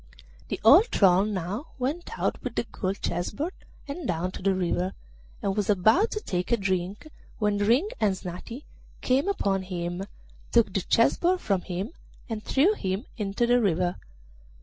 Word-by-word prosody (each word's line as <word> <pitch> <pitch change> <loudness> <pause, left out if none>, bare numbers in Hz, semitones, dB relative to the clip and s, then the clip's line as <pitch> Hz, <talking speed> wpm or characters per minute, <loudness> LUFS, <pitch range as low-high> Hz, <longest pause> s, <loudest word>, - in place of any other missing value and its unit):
The - - -3
old 295 - +8
troll 195 - +4
now 205 - -3
went 285 +7 -3
out - - -1
with - - -4
the - - +1
gold 190 0 -4
chess 175 +1 -1
board, 310 - -4 0.3
and 285 +1 -5
down 175 +2 -1
to - - -8
the 195 0 +2
river, 180 +1 -1 0.5
and 195 -1 0
was 210 -1 -1
about 220 - +4
to 425 - -3
take 180 - -3
a 235 - +4
drink, 190 +4 -2 0.3
when 210 -2 +1
Ring 235 - +3
and 205 -3 +2
Snati 185 +9 -7 0.4
came 265 +7 +2
upon 200 - +1
him, 180 0 -4 0.5
took 230 -5 +3
the 195 - +1
chess 230 +5 +3
board 360 +1 +2
from 195 - 0
him, 190 - -4 0.4
and 220 -3 -4
threw 320 +10 +3
him 195 - -3
into 210 +2 0
the 245 +1 +4
river. 180 -3 +1
205 Hz, 170 wpm, -27 LUFS, 185-250 Hz, 0.5 s, old